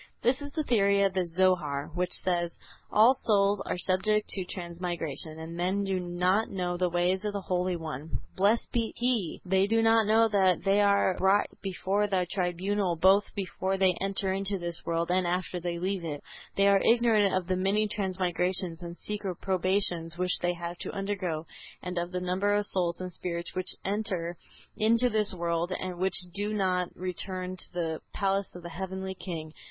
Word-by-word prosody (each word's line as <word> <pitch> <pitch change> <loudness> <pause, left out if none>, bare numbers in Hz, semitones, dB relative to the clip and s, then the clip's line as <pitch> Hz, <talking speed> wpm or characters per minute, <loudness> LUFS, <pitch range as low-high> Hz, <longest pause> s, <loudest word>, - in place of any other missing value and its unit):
This 255 +4 +2
is 285 0 -6
the 310 - -1
theory 200 -6 +3
of 195 -1 +2
the 185 -2 0
Zohar, 165 -5 +1
which 180 +1 0
says: 175 -2 0 0.4
"All 225 +5 +7
souls 205 -5 +2
are - - -1
subject 210 +4 +1
to 190 - 0
transmigration; 170 -4 -4
and 160 +1 -7
men 185 +3 0
do 190 -1 0
not 180 +4 +1
know 180 -2 -2
the 180 0 +1
ways 175 +3 +1
of 210 -1 -2
the 200 - -3
Holy 180 -1 0
One, 160 -2 -5 0.2
blessed 205 +5 +2
be 230 -2 -1
He! 240 -8 -1
They 190 +1 +3
do 225 +1 +2
not 225 -1 +4
know 225 +1 +5
that 190 -5 +3
they 200 +1 +3
are 200 -2 +4
brought 195 +2 +4 0.2
before 195 +2 0
the 190 -3 +1
tribunal 185 0 0
both 190 +5 +5
before 190 0 -2
they 190 -1 +4
enter 195 -1 0
into 195 +1 -1
this 170 -2 -4
world 170 +1 0
and 185 -1 +2
after 180 0 -1
they 170 0 -3
leave 185 +1 -2
it; 150 -3 -5 0.3
they 200 0 +4
are 200 -1 +5
ignorant 225 -4 +4
of 185 -1 0
the 185 +1 0
many 195 +3 +1
transmigrations 185 -3 -1
and 170 0 -7
secret 205 -3 -4
probations 185 -3 0
which 180 0 +1
they 175 0 0
have 170 0 -6
to - - -4
undergo, 185 -5 -2 0.4
and 180 -1 -2
of 175 +1 -3
the 180 - -2
number 185 +3 +1
of 205 0 +1
souls 175 -4 0
and 185 0 -5
spirits 170 0 -5
which 185 0 -1
enter 190 -4 -2 0.4
into 230 +3 +3
this 215 -1 +2
world 170 0 -1
and 180 -1 -4
which 190 -1 +1 0.2
do 205 +2 -1
not 185 -3 +1
return 185 0 -4
to - - -7
the 165 -2 -2
palace 195 -1 0
of 175 - -9
the 170 - -6
Heavenly 190 +2 -4
King. 160 -4 -6
185 Hz, 185 wpm, -29 LUFS, 175-200 Hz, 0.4 s, All